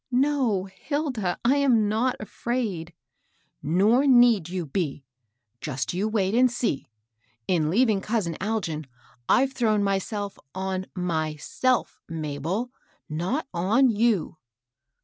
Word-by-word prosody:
" - - -54 0.2
No, 235 -10 0
Hilda; 220 - -3
I 265 +4 +4
am 245 -7 +3
not 230 +5 +1
afraid." 215 -6 -3 0.4
" - - -42
Nof 215 - +3
need 240 -9 +5
you 180 -2 -3
be. 145 -3 -3 0.5
Just 135 +3 -3
you 190 +4 0
wait 205 -3 0
and 250 +2 +5
see 240 - -2 0.6
1 185 - +2
In 155 -3 +1
leaving 215 +1 +3
cousin 210 -6 -1
Algin, 175 -8 -2 0.4
I've 270 +1 +4
thrown 215 -5 +2
myself 200 +1 -2 0.2
on 190 0 -3
myBelf^ 170 - -1
Mabel, 165 - -3 0.4
not 180 - -2
on 220 +9 +3
you. 215 -7 +1
205 Hz, 125 wpm, -25 LUFS, 175-240 Hz, 0.6 s, need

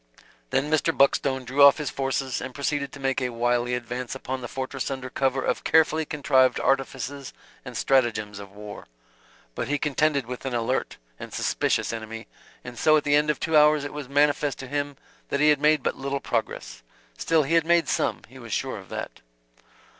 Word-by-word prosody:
Then 145 +3 0
Mr. 155 -3 +2
Buckstone 135 -1 +2
drew 135 +3 0
off 140 0 +9
his 150 -2 -3
forces 135 -1 -2
and 130 0 -7
proceeded 140 -1 -2
to 140 - -11
make 135 0 0
a 125 - 0
wily 120 +1 0
advance 125 +1 -5
upon 130 0 -5
the 120 - -5
fortress 130 +1 -4
under 130 -2 -5
cover 135 -1 0
of - - -1
carefully 160 0 +3
contrived 135 -4 +2
artifices 135 0 -1 0.3
and - - -7
stratagems 110 -6 +1
of 100 -1 -10
war. 105 +1 -10 0.7
But 120 - -3
he 145 +2 0
contended 150 -2 +1
with 125 +1 -7
an 130 -2 -3
alert 120 +3 -1 0.2
and - - -8
suspicious - - 0
enemy; 115 0 -6 0.4
and 125 -1 -9
so 155 0 +5
at 150 - 0
the 145 - +1
end 150 +1 +3
of 150 - 0
two 160 - -1
hours 150 -1 +5
it 145 - -6
was 145 -3 -7
manifest 145 0 +2
to 130 - -8
him 145 0 -3 0.3
that 140 - -1
he 150 +1 +5
had 145 -2 +3
made 150 -2 +3
but - - 0
little 140 +1 -3
progress. - - -3 0.3
Still, 160 - +2
he 145 +4 -2
had 165 -1 +5
made 170 0 +3
some; - - -1
he - - -14
was - - -10
sure - - -2
of - - -14
that. - - -6
135 Hz, 200 wpm, -25 LUFS, 125-145 Hz, 0.7 s, off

